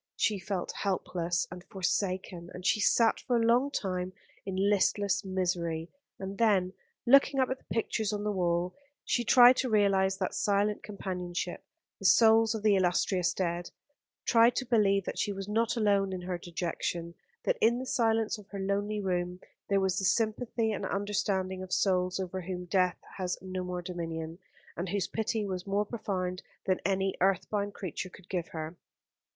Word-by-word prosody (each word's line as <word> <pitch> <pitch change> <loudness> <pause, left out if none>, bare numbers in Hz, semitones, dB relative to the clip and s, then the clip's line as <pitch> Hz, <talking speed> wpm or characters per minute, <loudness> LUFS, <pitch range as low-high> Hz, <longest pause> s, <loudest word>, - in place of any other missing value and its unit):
She 210 -3 +1
felt 185 -1 -3
helpless 175 -3 -1
and 180 0 -8
forsaken, 185 -3 -2
and 180 0 -8
she 215 - +3
sat 225 +2 +3
for 250 - -1
a 230 -1 +2
long 245 +4 +4
time 185 -7 -3 0.3
in 190 - -3
listless 200 0 +2
misery; 175 -3 -2 0.3
and 195 +1 -6
then, 195 -5 +3 0.3
looking 275 +2 +5
up 260 -1 +2
at 260 - -2
the - - -29
pictures 220 -1 0
on 205 -1 -3
the 210 - 0
wall, 175 -1 0 0.3
she 240 - +1
tried 245 +1 +7
to 255 - 0
realise 195 -3 +3
that - - -2
silent 205 +1 +1
companionship, 180 -4 -4 0.4
the - - -8
souls 225 0 +6
of 215 - -5
the 210 -2 +5
illustrious 180 0 +2
dead 175 -1 -2 0.6
tried 230 0 +5
to 255 - -1
believe 200 -5 +3
that - - -4
she 205 - 0
was 195 0 -5
not 225 +3 0
alone 200 -3 +2
in 185 - -4
her 180 -1 -4
dejection, 170 0 -3 0.3
that - - 0
in 235 +2 +4
the 260 - -4
silence 225 -4 +1
of 200 - -14
her 200 - -6
lonely 200 +2 -1
room 180 -2 -2 0.3
there 200 -1 +3
was 190 -1 +1
the - - -3
sympathy 225 +2 +1
and 210 - -3
understanding 195 -2 -1
of 185 -1 -8
souls 185 -1 +1
over 185 0 -3
whom 180 0 -5
death 180 0 +2 0.2
has 180 -1 -1
no 185 0 -5
more 180 -1 -4
dominion, 165 -1 -5 0.4
and 175 +1 -3
whose 195 -1 -1
pity 220 +1 -1
was 185 -1 -4
more 200 +1 +1
profound 185 -5 -3 0.2
than 185 -1 +1
any 195 0 +1
earth 190 0 +2
bound 205 -1 -1
creature 185 0 -5
could 185 +1 -16
give 175 -3 -2
her. 160 +1 -6
195 Hz, 175 wpm, -30 LUFS, 180-215 Hz, 0.6 s, tried